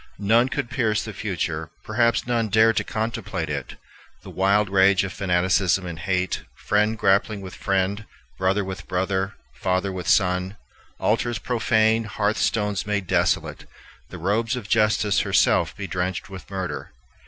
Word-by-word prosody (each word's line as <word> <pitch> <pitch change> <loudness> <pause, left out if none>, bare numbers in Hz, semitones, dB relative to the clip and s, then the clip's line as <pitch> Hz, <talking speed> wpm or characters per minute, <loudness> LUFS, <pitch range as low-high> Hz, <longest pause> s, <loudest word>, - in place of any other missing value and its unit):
None 115 +5 +3
could 135 -4 -3
pierce 115 -4 0
the 105 - -6
future, 95 -5 -3
perhaps 115 +2 +1
none 120 -2 0
dared 110 +2 +4
to - - +2
contemplate 105 -7 -3
it: 70 -3 -5 0.5
the - - -10
wild 100 +2 +2
rage 95 0 +4
of 95 -3 -4
fanaticism 90 0 +1
and 85 -3 -6
hate, 90 +1 -1 0.2
friend 105 +2 +2
grappling 100 +1 +2
with 95 -2 -9
friend, 100 +2 -1 0.3
brother 95 +2 +1
with 95 0 -7
brother, 95 +1 -1 0.2
father 95 +7 0
with 90 -1 -6
son; 90 0 +2 0.4
altars 120 -1 0
profaned, 115 -2 +1
hearth 105 0 +1
stones 105 -3 0
made 105 -2 -1
desolate, - - 0 0.4
the - - -8
robes 110 +7 0
of 120 -5 -6
Justice 105 -4 +2
herself - - +2
bedrenched 95 -1 -3
with 95 -1 -10
murder. 95 -9 -5
100 Hz, 145 wpm, -23 LUFS, 95-110 Hz, 0.5 s, dared